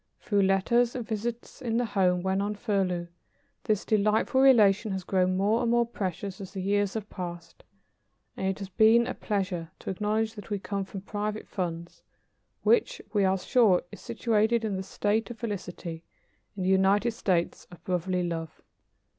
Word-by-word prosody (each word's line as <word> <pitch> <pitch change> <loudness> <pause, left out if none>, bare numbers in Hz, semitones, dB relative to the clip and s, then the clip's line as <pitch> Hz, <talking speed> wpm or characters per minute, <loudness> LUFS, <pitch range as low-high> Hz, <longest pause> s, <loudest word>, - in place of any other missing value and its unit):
Through 205 -2 +1
letters 230 +6 +2
and 245 -3 -3
visits 230 +4 -4
in 230 -3 -1
the 245 - +1
home 185 -4 +1
when 190 +1 +1
on 205 +1 -2
furlough, 190 -4 -1 0.6
this 215 -2 0
delightful 215 +5 +2
relation 215 -6 +5
has 190 -1 -3
grown 185 0 +1
more 210 +4 +2
and 235 - +1
more 235 0 +3
precious 195 -3 -4
as 190 0 -9
the 195 - -5
years 200 +1 0
have 215 -2 -4
passed, 175 -2 -7 0.7
and 190 - -2
it 190 0 -1
has 195 -2 -7
been 220 +4 +5
a 255 - -3
pleasure 185 -6 -2
to - - -5
acknowledge 215 +3 -1
that 210 -2 -10
we 205 - -1
come 200 0 -3
from 190 0 -7
Private 210 +1 -4
Funds, 170 -2 -5 0.6
which, 475 +1 +3
we 205 -2 +3
are 190 0 +3
sure, 200 -1 +3
is - - -11
situated 230 -1 +1
in 205 -3 -1
the 190 - -2
State 205 +4 -1
of 240 - -7
Felicity, 180 -7 -5 0.5
in 190 - -2
the 185 - +1
United 195 +4 +3
States 185 -6 -1
of 175 - -15
Brotherly 180 0 -1
Love. 165 -2 -4
200 Hz, 175 wpm, -28 LUFS, 185-220 Hz, 0.7 s, relation